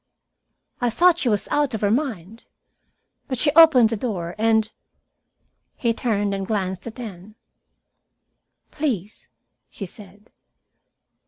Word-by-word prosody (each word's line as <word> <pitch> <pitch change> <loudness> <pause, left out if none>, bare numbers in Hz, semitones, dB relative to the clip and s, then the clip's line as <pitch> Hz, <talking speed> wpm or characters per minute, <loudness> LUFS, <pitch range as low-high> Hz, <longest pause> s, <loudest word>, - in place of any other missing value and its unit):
"I 245 - +2
thought 345 +8 +3
she 250 - +1
was 210 -2 0
out 290 -4 +1
of 220 - -5
her 205 -1 +2
mind. 225 - -3 0.8
But 260 - -3
she 290 +4 +2
opened 295 -8 +7
the - - 0
door, 190 -7 -4
and 220 -1 +2 0.5
" - - -50 0.3
He 235 -2 0
turned 205 -4 -1
and 195 -1 -4
glanced 190 -2 -3
at 230 +2 -9
Anne. 210 -2 -9 1.4
"Please!" 230 - -4 0.4
she 200 - -7
said. 205 +3 -11
220 Hz, 130 wpm, -22 LUFS, 200-250 Hz, 1.4 s, opened